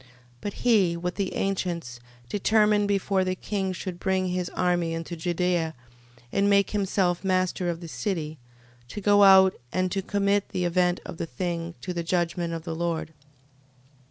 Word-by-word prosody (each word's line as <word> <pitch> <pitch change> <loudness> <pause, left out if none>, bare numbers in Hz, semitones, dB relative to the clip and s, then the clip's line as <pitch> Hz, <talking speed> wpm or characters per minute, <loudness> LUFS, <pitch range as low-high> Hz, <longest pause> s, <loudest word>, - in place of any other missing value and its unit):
13:13. 130 - -23 0.3
But 205 - -4
he, 195 -8 +2
with 180 +1 -3
the 195 -2 -3
ancients, 170 -10 -2 0.3
determined 210 - +3
before 195 -1 +1
the 185 0 -1
king 190 0 -2
should 185 -1 -6
bring 190 -1 0
his 180 0 -2
army 175 -2 +1
into 165 +1 -5
Judea, 175 -1 0 0.6
and 200 0 +2
make 200 0 +3
himself 190 -3 0
master 185 -1 0
of 170 0 -3
the 170 - -7
city, 160 -4 -3 0.5
to 130 - -6
go 205 0 +4
out, 190 -1 +8 0.2
and 185 0 0
to 195 - -1
commit 200 +1 0
the 180 - -2
event 180 0 +1
of - - -7
the 165 - -3
thing 170 +4 -4
to 180 - -4
the 170 - -2
judgment 170 0 -1
of 165 -1 -4
the 165 -1 -4
Lord. 165 -1 -2
180 Hz, 170 wpm, -26 LUFS, 170-195 Hz, 0.6 s, out